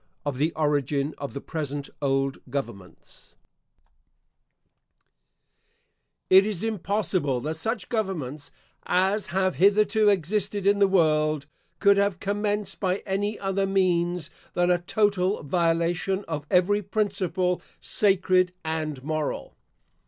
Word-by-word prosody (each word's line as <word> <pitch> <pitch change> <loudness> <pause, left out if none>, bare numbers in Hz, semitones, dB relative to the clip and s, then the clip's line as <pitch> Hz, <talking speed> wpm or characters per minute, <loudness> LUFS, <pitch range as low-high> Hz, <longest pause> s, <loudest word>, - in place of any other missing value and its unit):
OF 140 -3 -3
THE 155 +3 +2
ORIGIN 145 -1 0
OF 140 -1 -6
THE 140 - -4
PRESENT 145 -3 -4
OLD 135 -1 0
GOVERNMENTS 120 -9 -7 2.9
It 190 +1 +7
is 205 -2 -2
impossible 195 - -1
that 155 +4 -2
such 220 +3 -3
governments 155 - -3 0.4
as 190 +3 +1
have 185 -2 0
hitherto 210 +3 +4
existed 200 +2 0
in 200 0 +4
the 200 - +5
world, 155 -5 +2 0.3
could 200 -1 +4
have 200 -3 +1
commenced 205 -1 -2
by 190 0 -1
any 205 +2 -1
other 195 0 -1
means 175 -3 +1 0.2
than 175 0 +3
a 175 - +3
total 200 0 +1
violation 170 +5 0
of 150 -2 -4
every 195 +3 +3
principle 190 -3 -1 0.2
sacred 185 -2 +2
and 155 -4 -3
moral. 155 0 -3
180 Hz, 115 wpm, -26 LUFS, 155-200 Hz, 2.9 s, It